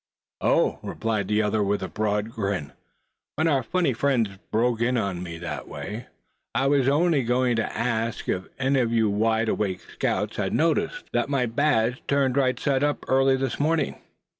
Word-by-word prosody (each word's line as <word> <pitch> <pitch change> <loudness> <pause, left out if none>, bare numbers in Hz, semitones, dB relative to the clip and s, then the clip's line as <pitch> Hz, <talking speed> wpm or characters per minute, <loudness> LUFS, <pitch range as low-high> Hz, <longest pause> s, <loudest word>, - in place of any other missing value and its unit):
"Oh!" - - +2
replied 110 -3 -2
the 105 +1 +2
other, 105 +1 +1
with 100 -1 0
a - - -2
broad 105 +1 -1
grin, 100 - -3 0.6
"when 160 +2 +1
our 140 -4 +3
funny 170 +3 0
friends 120 -3 +1 0.2
broke 115 +1 +1
in 125 +1 +2
on 95 -5 -2
me 85 -2 -6
that 75 -5 -5
way, 110 +5 -6 0.5
I 135 - +2
was 135 -2 +3
only 155 0 +3
going 125 0 +1
to 115 - -2
ask 115 -1 -1
if 95 0 -1
any 135 +1 +2
of 120 -2 +1
you 110 -3 +2
wide 110 +2 +1
awake 95 -4 -1
scouts - - -2
had - - -1
noticed 165 - +1
that - - +3
I - - +4
had - - -5
my 135 -3 +1
badge 125 -1 +1
turned 140 -2 +2
right 130 -3 +2
side 140 -1 +1
up, 145 0 0
early 135 0 +4
this 135 -2 -2
morning?" 155 0 +1
120 Hz, 190 wpm, -25 LUFS, 105-135 Hz, 0.6 s, I